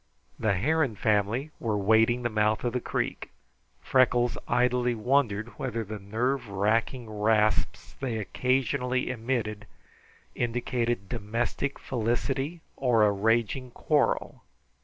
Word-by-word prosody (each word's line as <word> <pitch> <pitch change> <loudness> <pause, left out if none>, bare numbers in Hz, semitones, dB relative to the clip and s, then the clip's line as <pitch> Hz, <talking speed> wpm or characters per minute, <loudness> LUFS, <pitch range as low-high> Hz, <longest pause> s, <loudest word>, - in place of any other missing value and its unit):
The 110 -3 +2
heron 140 - +1
family 110 +7 0
were 110 -4 -1
wading 110 +4 +3
the 120 - +1
mouth 105 0 +1
of 120 -1 -1
the 125 - -1
creek. - - -3 0.5
Freckles 125 -1 +3
idly 125 0 +2
wondered 115 -2 +1
whether 115 -3 -2
the 105 0 -7
nerve 115 +5 -1
racking 110 +5 0
rasps 110 0 +1
they 125 -5 -2
occasionally 125 +3 0
emitted 110 -4 -3 0.7
indicated 120 -3 -1
domestic 115 +5 -2
felicity 135 +6 -2
or 120 -5 +3
a 105 - +5
raging 115 +5 +1
quarrel. - - 0
115 Hz, 115 wpm, -28 LUFS, 110-125 Hz, 0.7 s, a